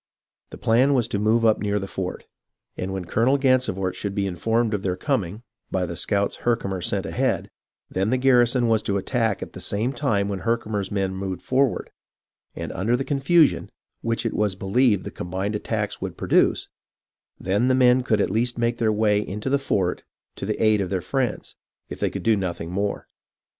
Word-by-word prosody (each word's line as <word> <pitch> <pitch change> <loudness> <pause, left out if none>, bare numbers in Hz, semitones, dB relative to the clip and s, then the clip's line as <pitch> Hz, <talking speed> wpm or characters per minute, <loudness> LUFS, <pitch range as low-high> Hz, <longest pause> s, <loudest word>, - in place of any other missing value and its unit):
The - - -10
plan 130 +5 +3
was 120 -3 +2
to 100 - -1
move 110 +2 +2
up 110 -1 +4
near 105 0 0
the 95 - -2
fort, 95 -1 -5 0.5
and 95 +1 -4
when 95 -2 -4
Colonel 120 +10 +2
Gansevoort 125 -9 +1
should 100 0 -4
be 100 - 0
informed 110 +5 0
of 105 - -1
their 95 -2 -1
coming, 110 - -2 0.3
by 90 -1 0
the 85 0 -5
scouts 100 +3 0
Herkimer 100 -6 -1
sent - - -1
ahead, - - -1 0.4
then 95 +3 -1
the 130 - +2
garrison 125 -1 +4
was 110 -1 +3
to 100 -2 -1
attack 115 0 0
at - - -10
the - - -8
same 110 +6 -1
time 105 -9 0
when 100 -2 -3
Herkimer's 110 -4 -1
men 95 -2 -1
moved 95 -1 -4
forward; 130 -1 +1 0.6
and - - -5
under 110 +7 0
the 135 - -3
confusion, 145 +3 +3 0.3
which 115 +1 -1
it 115 - 0
was 105 -3 0
believed 100 +2 +2
the - - -6
combined 95 +4 -3
attacks 105 - -3
would - - -5
produce, - - +2 0.7
then 100 +6 +1
the 130 - +4
men 125 0 +5
could 110 -4 +1
at 100 - +1
least 120 +3 0
make 120 0 0
their 110 -2 +2
way 105 -1 +2
into 105 +6 -4
the 140 - +3
fort 95 -9 0 0.3
to 95 - -5
the 105 - -2
aid 110 -2 +3
of 95 - -2
their 95 - 0
friends, 125 +6 -2 0.3
if - - -7
they - - +1
could - - -6
do 115 -1 +4
nothing 85 -4 -3
more. 100 +2 -2
105 Hz, 195 wpm, -24 LUFS, 95-120 Hz, 0.7 s, men